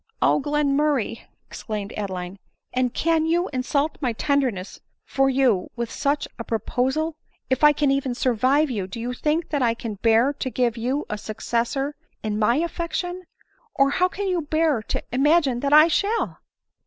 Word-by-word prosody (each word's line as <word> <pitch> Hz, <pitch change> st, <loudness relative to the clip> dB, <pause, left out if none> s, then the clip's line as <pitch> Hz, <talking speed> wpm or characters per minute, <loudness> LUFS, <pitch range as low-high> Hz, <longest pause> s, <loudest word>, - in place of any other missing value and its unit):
" -, -, -44 dB
O -, -, +2 dB
Glenmurray 290 Hz, -4 st, 0 dB
!" -, -, -48 dB
exclaimed 210 Hz, -2 st, -5 dB
Adeline, 190 Hz, -2 st, -5 dB, 0.2 s
" -, -, -51 dB
and 250 Hz, -1 st, +1 dB
can 325 Hz, +2 st, +1 dB
you 345 Hz, +2 st, +1 dB
insult 280 Hz, +4 st, -1 dB
my 250 Hz, -4 st, 0 dB
tenderness 250 Hz, -7 st, -1 dB, 0.3 s
for 270 Hz, 0 st, +2 dB
you 255 Hz, -8 st, +2 dB
with 235 Hz, -1 st, -4 dB
such 285 Hz, 0 st, -1 dB
a -, -, -3 dB
proposal? 265 Hz, +8 st, -1 dB, 0.4 s
If 260 Hz, +3 st, +1 dB
I 300 Hz, -, +9 dB
can 290 Hz, -1 st, +1 dB
even 275 Hz, -2 st, 0 dB
survive 260 Hz, +4 st, +2 dB
you, 200 Hz, -6 st, -3 dB
do 195 Hz, +5 st, -7 dB
you 245 Hz, +2 st, -3 dB
think 315 Hz, +5 st, -1 dB
that 290 Hz, -3 st, -1 dB
I 230 Hz, -2 st, +2 dB
can 220 Hz, -4 st, -6 dB
bear 230 Hz, +5 st, +4 dB
to 270 Hz, -2 st, -4 dB
give 245 Hz, -2 st, 0 dB
you 255 Hz, +5 st, -2 dB
a 210 Hz, -1 st, -4 dB
successor 235 Hz, +6 st, -2 dB, 0.3 s
in 215 Hz, -1 st, -2 dB
my 220 Hz, +3 st, +3 dB
affection? 340 Hz, +3 st, -2 dB, 0.5 s
or, 275 Hz, 0 st, +3 dB
how 360 Hz, +5 st, +3 dB
can 395 Hz, +2 st, -4 dB
you 360 Hz, -2 st, 0 dB
bear 310 Hz, -4 st, +1 dB
to -, -, -2 dB
imagine 275 Hz, 0 st, +3 dB
that 280 Hz, +2 st, -1 dB
I 305 Hz, +2 st, +8 dB
shall 405 Hz, +7 st, 0 dB
270 Hz, 180 wpm, -23 LUFS, 235-300 Hz, 0.5 s, I